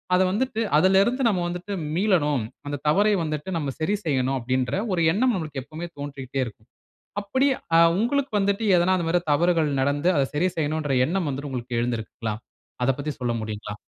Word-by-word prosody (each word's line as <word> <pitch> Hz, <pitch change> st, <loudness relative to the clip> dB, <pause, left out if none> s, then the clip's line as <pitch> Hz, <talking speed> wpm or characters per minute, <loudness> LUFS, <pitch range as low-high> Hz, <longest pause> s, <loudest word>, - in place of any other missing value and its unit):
அத 180 Hz, -, +4 dB
வந்துட்டு 225 Hz, +2 st, -1 dB, 0.2 s
அதில 190 Hz, +4 st, +5 dB
இருந்து 250 Hz, +5 st, -1 dB
நம்ம 190 Hz, -4 st, 0 dB
வந்துட்டு 180 Hz, +3 st, -5 dB, 0.2 s
மீளணும், 165 Hz, -, +2 dB, 0.2 s
அந்த 145 Hz, -1 st, -3 dB
தவறை 205 Hz, +7 st, +4 dB
வந்துட்டு 155 Hz, +1 st, -4 dB
நம்ம 145 Hz, -4 st, -2 dB
சரி 160 Hz, +6 st, +1 dB
செய்யணும் 135 Hz, -3 st, +1 dB
அப்பிடின்ற 130 Hz, +1 st, -1 dB, 0.2 s
ஒரு 175 Hz, -, +1 dB
எண்ணம் 245 Hz, +5 st, +2 dB
நமக்கு 155 Hz, -5 st, -4 dB
எப்பவுமே 160 Hz, +5 st, -7 dB
தோன்றிட்டே 140 Hz, -2 st, -5 dB
இருக்கும். 110 Hz, 0 st, -12 dB, 0.5 s
அப்பிடி 260 Hz, +7 st, +1 dB, 0.3 s
ஆ -, -, +7 dB, 0.2 s
உங்களுக்கு 265 Hz, +4 st, 0 dB
வந்துட்டு 200 Hz, +2 st, 0 dB
எதனா 175 Hz, +2 st, +3 dB
அந்தமாரி 175 Hz, 0 st, +1 dB
தவறுகள் 165 Hz, 0 st, +2 dB
நடந்து 145 Hz, +5 st, +1 dB
அத 140 Hz, -, +3 dB
சரி 170 Hz, +5 st, +2 dB
செய்யணுன்ற 155 Hz, -2 st, -1 dB
எண்ணம் 180 Hz, +2 st, -1 dB
வந்துட்டு 140 Hz, +1 st, -4 dB
உங்களுக்கு 120 Hz, -2 st, -3 dB
எழுந்திருக்குங்களா? 115 Hz, -2 st, -3 dB, 0.5 s
அதப் 135 Hz, +1 st, +1 dB
பத்தி 150 Hz, +1 st, -3 dB
சொல்ல 120 Hz, -1 st, 0 dB
முடியுங்களா? 105 Hz, -1 st, -5 dB
155 Hz, 170 wpm, -24 LUFS, 135-185 Hz, 0.5 s, ஆ